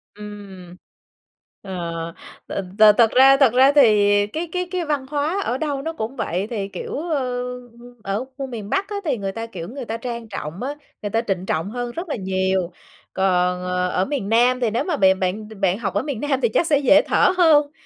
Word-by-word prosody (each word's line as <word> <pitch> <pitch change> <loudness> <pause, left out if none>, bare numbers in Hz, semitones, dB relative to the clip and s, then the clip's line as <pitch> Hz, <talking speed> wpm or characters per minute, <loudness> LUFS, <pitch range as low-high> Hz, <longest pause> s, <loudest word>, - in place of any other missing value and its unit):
Ừm. 200 -4 -10 0.9
Ờ, 170 -3 -5 0.3
th - - -13 0.5
thật 230 -2 +5
ra 270 +1 +7
thật 270 -5 +4
ra 265 +3 +6
thì 210 -7 +5 0.2
cái 320 +9 -5
cái 360 0 -2
cái 360 -2 -2
văn 295 -3 -1
hóa 300 +7 -1
ở 245 - -1
đâu 285 -2 -2
nó 325 +3 -4
cũng 230 -2 -5
vậy, 195 -5 -2
thì, 205 -4 -3
kiểu, 195 - -6
ờ, 255 -5 -1 0.6
ở 200 +5 -2
khu 275 -1 -4
miền 220 -5 -7
Bắc 390 - 0
á 415 - -4
thì 280 -6 0
người 195 -2 -3
ta, 225 +3 -5
kiểu, 175 -6 -7
người 260 +1 -7
ta 225 0 -4
trang 235 -1 -6
trọng 180 0 -6
á, 280 +3 -3 0.3
người 205 - -3
ta 225 +2 +1
trịnh 185 -2 -1
trọng 165 +1 -2
hơn 245 0 -4
rất 340 +7 -6
là - - -1
nhiều. 190 -2 -1 0.4
Còn, 180 -1 +1
ờ, 180 0 -1
ở 185 +1 0
miền 265 -7 -3
Nam 245 +3 +3
thì 240 -3 +1
nếu 225 +3 -1
mà 350 -4 -2
bè 190 -1 +5
bạn 190 +3 -3
bạn 190 +1 +1
học 200 -5 -3
ở 205 - 0
miền 280 -7 -4
Nam 275 -2 0
thì 235 - +2
chắc 325 +9 +1
sẽ 290 -3 +3
dễ 290 +1 +5
thở - - +3
hơn, 300 -5 +5
230 Hz, 215 wpm, -21 LUFS, 190-275 Hz, 0.9 s, ra